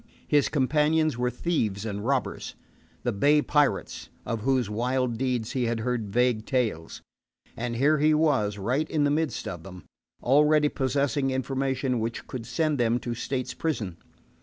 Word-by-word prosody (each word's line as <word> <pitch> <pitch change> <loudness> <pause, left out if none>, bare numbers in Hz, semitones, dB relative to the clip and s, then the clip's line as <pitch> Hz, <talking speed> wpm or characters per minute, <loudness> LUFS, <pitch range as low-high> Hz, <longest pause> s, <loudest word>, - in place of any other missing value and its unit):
His 145 -2 +3
companions 150 +2 +2
were 125 +1 0
thieves 115 - -1
and 100 -2 -4
robbers 135 +2 -2 0.5
the - - +1
bay 145 +9 +4
pirates, 145 -2 0 0.2
of 115 -3 -3
whose 130 -1 +1
wild 125 +3 0
deeds 125 -4 -1
he 125 -2 0
had 115 -1 -1
heard 120 -3 -2
vague 120 0 +1
tales. 110 - -2 0.5
And 120 0 -3
here 145 +5 +3
he 155 +1 +4
was, 135 -10 +2
right 125 +10 -1
in 150 -2 +1
the 145 - +2
midst 155 0 -1
of 85 -3 -5
them, 90 -1 -11 0.4
already 150 +3 +4
possessing 140 +1 0
information 130 -1 -1
which 115 +1 -3
could 120 -3 -7
send 155 -4 0
them 120 0 +2
to 120 - -3
State's 125 +2 -3
prison. 110 - -3
130 Hz, 160 wpm, -27 LUFS, 115-145 Hz, 0.5 s, bay